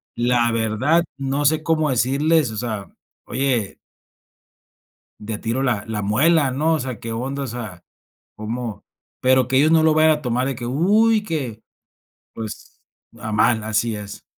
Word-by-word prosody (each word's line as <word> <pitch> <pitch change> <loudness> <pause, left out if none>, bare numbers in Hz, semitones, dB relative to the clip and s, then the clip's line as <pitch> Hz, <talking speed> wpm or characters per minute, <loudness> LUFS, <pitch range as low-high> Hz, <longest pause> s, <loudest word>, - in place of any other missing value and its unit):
la 120 0 +2
verdad, 115 +9 +1
no 140 +1 -1
sé 155 +1 +2
cómo 155 -2 +1
decirles, 140 +2 +2
o 110 - -7
sea, 110 -4 -4 0.4
oye 125 -7 -1 1.4
de 105 0 -4
tiro 120 +4 -2
la 115 -6 0
la 110 -2 -3
amuelan, 135 +7 +2
¿no?, 160 +2 +2
o - - 0
sea, 125 -4 -5
¿qué 115 0 -6
onda?, 135 +4 -3
o - - -3
sea, 110 -7 -7 0.5
cómo, 110 -1 -5 0.4
pero 130 -1 +3
que 130 - +1
ellos 150 +3 +5
no 160 -1 +5
lo 160 -1 +4
vayan 155 0 +5
a 150 - -1
tomar 125 +1 0
de 135 - -1
que: 120 0 -6
"¡Uy, 210 - +3
que", 130 - -4 0.7
pues, 110 -2 -8 0.4
a 110 0 -5
mal, 110 +1 +2
así 110 0 0
es. 105 -1 -9
125 Hz, 165 wpm, -21 LUFS, 110-150 Hz, 1.4 s, ellos